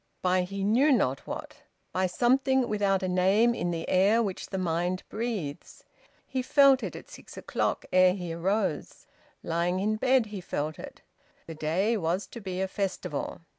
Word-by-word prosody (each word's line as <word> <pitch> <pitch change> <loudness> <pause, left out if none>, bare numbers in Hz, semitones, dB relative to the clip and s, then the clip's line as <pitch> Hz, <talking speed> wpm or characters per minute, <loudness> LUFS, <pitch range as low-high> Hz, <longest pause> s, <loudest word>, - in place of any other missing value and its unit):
By 185 0 +3
he 195 +2 -4
knew 245 +9 +4
not 140 - +1
what. - - -7 0.3
By 185 0 +1
something 260 +5 +2
without 200 -3 +1
a - - 0
name 190 +6 +3
in 175 - -2
the 165 -1 -3
air 205 +5 +3
which 195 -4 -4
the 190 - -4
mind 180 +1 -1
breathes. 210 -11 -5 0.4
He 260 -1 -2
felt 275 0 +5
it - - -5
at - - -10
six - - -13
o'clock, - - -2
ere 185 0 +5
he 175 -4 -5
arose. 190 +1 -2 0.4
Lying 170 +2 0
in 215 +2 0
bed 255 0 +3
he 195 - -5
felt 155 -2 -4
it. - - -10 0.4
The 165 - -7
day 175 +9 0
was 180 +1 -1
to 235 - -9
be 185 -2 -4
a 190 - 0
festival. 190 -8 -4
190 Hz, 170 wpm, -28 LUFS, 175-225 Hz, 0.4 s, felt